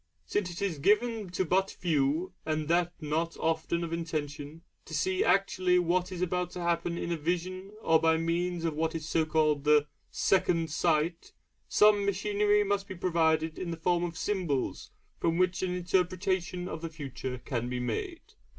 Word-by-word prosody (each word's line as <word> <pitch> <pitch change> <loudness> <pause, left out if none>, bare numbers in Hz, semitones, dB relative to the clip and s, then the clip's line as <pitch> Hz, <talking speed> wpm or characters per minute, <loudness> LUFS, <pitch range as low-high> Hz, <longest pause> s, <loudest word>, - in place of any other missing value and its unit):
Since 190 - -1
it 175 +3 -5
is 175 -7 -1
given 210 +4 +2
to 180 +1 -1
but 190 +3 +2
few, 160 +2 0
and 155 -1 -2
that 175 0 +2
not 160 +2 -2
often 165 +1 0
of 165 0 -4
intention, 155 -1 -4 0.2
to - - -6
see 375 +1 +1
actually 185 - +3
what 180 +1 +1
is 180 -1 -2
about 180 0 -1
to 180 - -5
happen 170 0 0
in 170 - -3
a 170 - 0
vision 180 +4 -2
or 160 0 +5
by 160 0 +4
means 170 +1 -1
of 165 - 0
what 160 +2 -1
is 160 0 -5
called 155 -2 +2
the 150 0 +5 0.2
'second 165 -4 +1
sight,' 165 +1 0 0.4
some 210 -1 +5
machinery 205 +1 +2
must 200 0 -1
be 190 - -7
provided 160 -2 +1
in 180 - -4
the 165 - -4
form 175 +1 +1
of 170 -2 -4
symbols 175 -11 -2 0.3
from 165 0 +1
which 185 0 +1
an 180 -1 -1
interpretation 180 0 0
of 160 - -5
the 165 - -4
future 135 -4 -6
can 120 -1 -3
be 125 0 -2
made. 340 - -3
170 Hz, 175 wpm, -30 LUFS, 160-185 Hz, 0.4 s, or